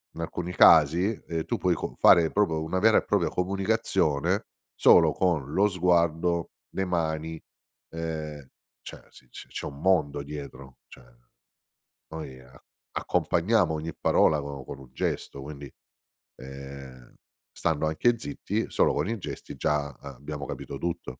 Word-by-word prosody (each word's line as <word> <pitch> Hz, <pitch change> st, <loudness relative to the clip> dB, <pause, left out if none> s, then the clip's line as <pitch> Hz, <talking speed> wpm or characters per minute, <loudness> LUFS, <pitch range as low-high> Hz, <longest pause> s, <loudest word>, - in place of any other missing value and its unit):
In 85 Hz, -, -6 dB
alcuni 90 Hz, +2 st, -4 dB
casi, 80 Hz, +5 st, +6 dB, 0.2 s
ehm, 80 Hz, -1 st, -3 dB
tu -, -, -2 dB
puoi -, -, +1 dB
con -, -, -5 dB
fare 80 Hz, -2 st, +6 dB
proprio 85 Hz, -7 st, +1 dB
una 95 Hz, +4 st, -1 dB
vera 110 Hz, +2 st, +5 dB
e -, -, +2 dB
propria 100 Hz, -4 st, +1 dB
comunicazione, 90 Hz, -6 st, 0 dB, 0.3 s
solo -, -, +6 dB
con 80 Hz, -6 st, 0 dB
lo 100 Hz, +2 st, +4 dB
sguardo, 85 Hz, -2 st, +1 dB, 0.2 s
le 95 Hz, -, 0 dB
mani, 80 Hz, -2 st, -2 dB, 0.5 s
ehm, 80 Hz, -4 st, -5 dB, 0.3 s
cioè -, -, -10 dB
si -, -, -18 dB
se -, -, -10 dB
c'è -, -, -6 dB
un 70 Hz, 0 st, -7 dB
mondo 75 Hz, -6 st, +2 dB
dietro. 70 Hz, -2 st, -9 dB
Cioè 65 Hz, -, -15 dB, 1.1 s
noi, 65 Hz, -5 st, -8 dB, 0.5 s
accompagniamo 90 Hz, -1 st, +1 dB
ogni 80 Hz, +1 st, -4 dB
parola 75 Hz, -, +3 dB
co 70 Hz, -2 st, -6 dB
con 65 Hz, -, -9 dB
un 65 Hz, -, -14 dB
gesto, 70 Hz, +1 st, -3 dB
quindi, 70 Hz, -2 st, -9 dB, 0.6 s
ehm, 65 Hz, -1 st, -11 dB, 0.4 s
stando 80 Hz, -1 st, 0 dB
anche 115 Hz, +10 st, +2 dB
zitti, 115 Hz, -6 st, -3 dB
solo -, -, +3 dB
con -, -, -1 dB
i 115 Hz, -, -2 dB
gesti 70 Hz, -6 st, -7 dB
già, 75 Hz, -1 st, 0 dB
ehm, 70 Hz, +1 st, -11 dB
abbiamo 70 Hz, +2 st, -7 dB
capito -, -, -6 dB
tutto. 85 Hz, -6 st, -5 dB
80 Hz, 145 wpm, -27 LUFS, 70-90 Hz, 1.1 s, casi